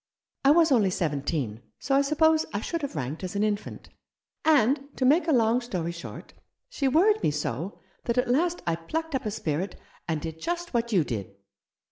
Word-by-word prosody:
I 275 Hz, -, +5 dB
was 320 Hz, +1 st, +5 dB
only 215 Hz, -7 st, +4 dB
seventeen, 145 Hz, -, -2 dB, 0.2 s
so 275 Hz, -, -2 dB
I 275 Hz, -, +5 dB
suppose 315 Hz, +2 st, +3 dB
I 200 Hz, -, 0 dB
should 335 Hz, +6 st, -3 dB
have 280 Hz, -, -4 dB
ranked 150 Hz, +4 st, -4 dB
as 185 Hz, +1 st, -5 dB
an 200 Hz, -, +1 dB
infant. 210 Hz, -1 st, -3 dB, 0.5 s
And 280 Hz, -3 st, +4 dB, 0.2 s
to 260 Hz, -, +1 dB
make 315 Hz, +6 st, +4 dB
a -, -, +3 dB
long 235 Hz, -2 st, +3 dB
story 180 Hz, -8 st, -3 dB
short, 170 Hz, 0 st, -9 dB, 0.4 s
she 300 Hz, -, -1 dB
worried 390 Hz, +10 st, +4 dB
me -, -, +2 dB
so 150 Hz, -, -3 dB, 0.3 s
that 235 Hz, +1 st, -1 dB
at 250 Hz, -, +2 dB
last 335 Hz, +8 st, +1 dB
I 170 Hz, -, +1 dB
plucked 320 Hz, -, -4 dB
up 260 Hz, -4 st, -1 dB
a -, -, 0 dB
spirit, 180 Hz, -3 st, -3 dB, 0.3 s
and 160 Hz, -2 st, -1 dB
did 160 Hz, +1 st, -7 dB
just 345 Hz, -1 st, -3 dB
what 235 Hz, 0 st, 0 dB
you 185 Hz, -6 st, +4 dB
did." 100 Hz, -7 st, -5 dB
230 Hz, 195 wpm, -27 LUFS, -, 0.5 s, I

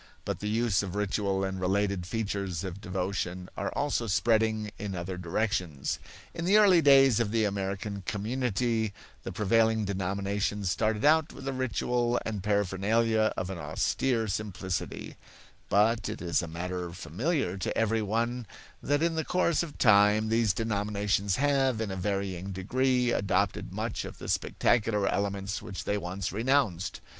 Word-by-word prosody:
But -, -, -3 dB
the 105 Hz, -, -3 dB
use 115 Hz, -2 st, +2 dB
of 100 Hz, -2 st, -5 dB
ritual 100 Hz, -1 st, 0 dB
and 95 Hz, -1 st, -3 dB
related 95 Hz, -1 st, 0 dB
features 100 Hz, -5 st, -2 dB
of 95 Hz, +1 st, -6 dB
devotion 90 Hz, -1 st, -3 dB
are -, -, -3 dB
also 140 Hz, -5 st, -1 dB
spreading 110 Hz, +2 st, +1 dB
in 100 Hz, -2 st, -4 dB
other 90 Hz, +1 st, -4 dB
directions. 90 Hz, -5 st, -2 dB, 0.3 s
In 170 Hz, -, -5 dB
the 195 Hz, +4 st, +5 dB
early 195 Hz, -5 st, +6 dB
days 135 Hz, -5 st, +6 dB
of 115 Hz, -3 st, +1 dB
the 110 Hz, 0 st, +1 dB
American 100 Hz, 0 st, -3 dB
community 115 Hz, 0 st, -1 dB, 0.3 s
the -, -, -6 dB
prevailing 110 Hz, +1 st, +2 dB
denominations 100 Hz, +1 st, -1 dB
started 110 Hz, +4 st, 0 dB
out 160 Hz, +1 st, +4 dB
with 135 Hz, -, -9 dB
a 135 Hz, -, -1 dB
ritual 125 Hz, -1 st, 0 dB
and 105 Hz, -3 st, -3 dB
paraphernalia 105 Hz, +3 st, +1 dB
of 90 Hz, +1 st, -2 dB
an 90 Hz, -, -5 dB
austere 110 Hz, -, 0 dB
simplicity; 95 Hz, -2 st, -4 dB, 0.5 s
but 110 Hz, +3 st, +3 dB
it 110 Hz, -, -5 dB
is 85 Hz, 0 st, 0 dB
a 85 Hz, -, -5 dB
matter 90 Hz, +1 st, -4 dB
familiar 105 Hz, -, -1 dB
to 95 Hz, -, -2 dB
every 115 Hz, 0 st, +2 dB
one 115 Hz, +3 st, -1 dB, 0.3 s
that 145 Hz, +3 st, +1 dB
in 170 Hz, 0 st, +2 dB
the 160 Hz, 0 st, -1 dB
course 170 Hz, -2 st, +1 dB
of 165 Hz, -4 st, -6 dB
time 105 Hz, -1 st, +5 dB
these 115 Hz, -2 st, +3 dB
denominations 100 Hz, -2 st, 0 dB
have, 135 Hz, -4 st, +2 dB
in 110 Hz, -3 st, -2 dB
a -, -, -3 dB
varying 95 Hz, -1 st, -2 dB
degree, 125 Hz, +6 st, +1 dB
adopted 100 Hz, -1 st, 0 dB
much -, -, -3 dB
of -, -, -8 dB
the -, -, -8 dB
spectacular 105 Hz, -3 st, +1 dB
elements 100 Hz, 0 st, -1 dB
which 95 Hz, -, -6 dB
they 100 Hz, -, -1 dB
once 90 Hz, +1 st, -4 dB
renounced. 110 Hz, -6 st, 0 dB
105 Hz, 155 wpm, -29 LUFS, 95-115 Hz, 0.5 s, early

